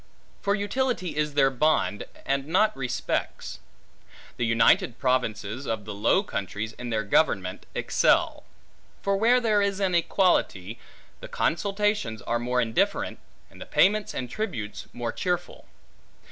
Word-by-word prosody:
For 200 0 +1
utility 205 - -1
is 150 -1 -1
their 135 -2 +4
bond, 135 -6 +1 0.2
and 140 0 -1
not 215 +7 +2
respects. 135 -2 -3 0.8
The 120 - 0
united 115 +1 +3
provinces 125 -1 -1
of 110 -2 -3
the 105 - -6
Low 110 - +2
Countries, 105 - -4
in 125 +1 -7
their 110 -2 0
government, 95 -5 +1
excel; - - +2 0.6
for 200 0 +1
where 235 +5 +4
there 215 -4 +2
is 200 -1 0
an 190 -2 +1
equality, 165 - +1 0.4
the - - -8
consultations 200 - -1
are 120 0 -1
more 125 +1 0
indifferent, 115 -2 0 0.3
and - - -15
the - - -8
payments 210 +2 +2
and 125 - -3
tributes, 125 - -5
more 120 -1 -4
cheerful. 175 -1 -3
135 Hz, 135 wpm, -26 LUFS, -, 0.8 s, their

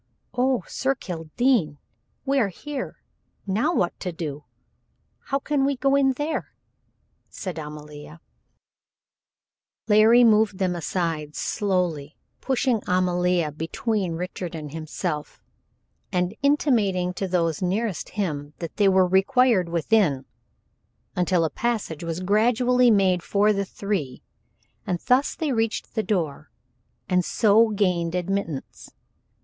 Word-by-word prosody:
"Oh! 250 -3 +1
Sir 270 +1 -1
Kildene 175 - 0 0.5
we 275 0 +2
are 225 - +3
here 275 +8 -7 0.4
now 215 - +1
what 180 - 0
to 180 - -3
do! 150 -3 -6 0.8
How 275 - 0
can 280 0 0
we 280 +1 +1
go 275 +2 +2
in 270 -1 +3
there?" 295 +4 -4 0.7
said 180 -4 -6
Amalia. 150 +1 -9 1.7
Larry 220 +3 +6
moved 215 -3 +4
them 185 -2 0
aside 165 -3 -3
slowly, 175 -7 -1 0.2
pushing 255 -4 0
Amalia 180 -2 +1
between 175 +5 -2
Richard 180 0 -5
and 150 -3 -7
himself, 155 -1 -4 0.7
and 180 0 0
intimating 220 -11 +2
to 195 +1 -3
those 170 -3 0
nearest 195 +2 -1
him 150 -7 -3
that 165 -2 -7
they 205 -2 +4
were 190 -1 +4
required 195 +1 +3
within, 170 -5 +1 0.9
until 180 -1 +2
a 155 - -2
passage 220 -10 -2
was 165 +1 -3
gradually 240 +5 +3
made 190 -4 +3
for 205 +4 +2
the 200 0 -1
three, 185 -10 -4 0.6
and 180 - 0
thus 255 +3 +3
they 315 -4 -2
reached 225 -2 -1
the 220 - 0
door 165 -9 -2 0.6
and 180 -1 +2
so 220 +4 +4
gained 180 -5 0
admittance. 180 -5 -3
190 Hz, 120 wpm, -24 LUFS, 165-230 Hz, 1.7 s, Larry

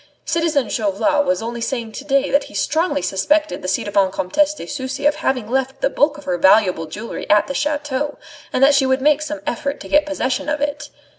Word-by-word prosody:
Citizen 320 -7 +1
Chauvelin 240 +9 0
was 275 -4 0
only 235 +1 -5
saying 230 -2 -3
to 270 - -8
day 275 -1 +1
that 280 - +2
he - - -13
strongly 315 - 0
suspected 300 - 0
the 185 - -5
ci 190 - 0
devant 200 -2 +1
Comtesse 295 +13 +1
de - - -8
Sucy 275 0 -5
of 295 +1 +3
having 255 -7 -1
left 265 +2 -1
the - - +1
bulk 295 +1 +2
of 295 - -11
her 180 -8 -2
valuable 190 -3 +4
jewellery 210 +9 -7
at 210 0 +5
the 275 - -5
chateau, 290 -1 -2 0.3
and 260 - +1
that 280 +1 +6
she 275 -1 +3
would 260 0 +2
make 300 0 +4
some 305 0 -5
effort 280 +4 -3
to - - -9
get 295 0 +3
possession 290 -1 -2
of 300 0 -1
it. 290 +1 -3
275 Hz, 220 wpm, -20 LUFS, 225-295 Hz, 0.3 s, that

